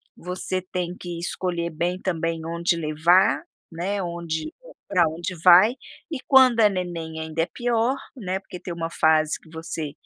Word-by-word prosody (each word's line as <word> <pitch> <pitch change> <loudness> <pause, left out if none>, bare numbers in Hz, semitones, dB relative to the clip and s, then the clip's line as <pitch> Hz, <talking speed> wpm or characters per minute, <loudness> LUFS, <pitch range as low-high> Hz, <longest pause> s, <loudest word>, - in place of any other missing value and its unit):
você 185 +1 -4
tem 180 -1 -4
que 175 -1 -6
escolher 175 -1 -2
bem 175 +3 -2
também, 165 -2 -1
onde 170 +1 0
levar, 155 -1 +3 0.3
né, 190 +4 -3
onde 170 - -4 0.3
pra 180 -3 +3
onde 170 +3 -5
vai, 185 +5 +8 0.4
e 305 - -3
quando 255 -4 +6
é 210 - +6
neném 170 -4 -4
ainda 160 +1 -2
é - - +2
pior, 240 +4 0 0.2
né, 190 -5 -3
porque 185 -2 -10
tem 175 - -6
uma 165 -1 -4
fase, 155 -2 +2
que 160 - -21
você, 160 -2 -5
175 Hz, 160 wpm, -24 LUFS, 165-185 Hz, 0.4 s, vai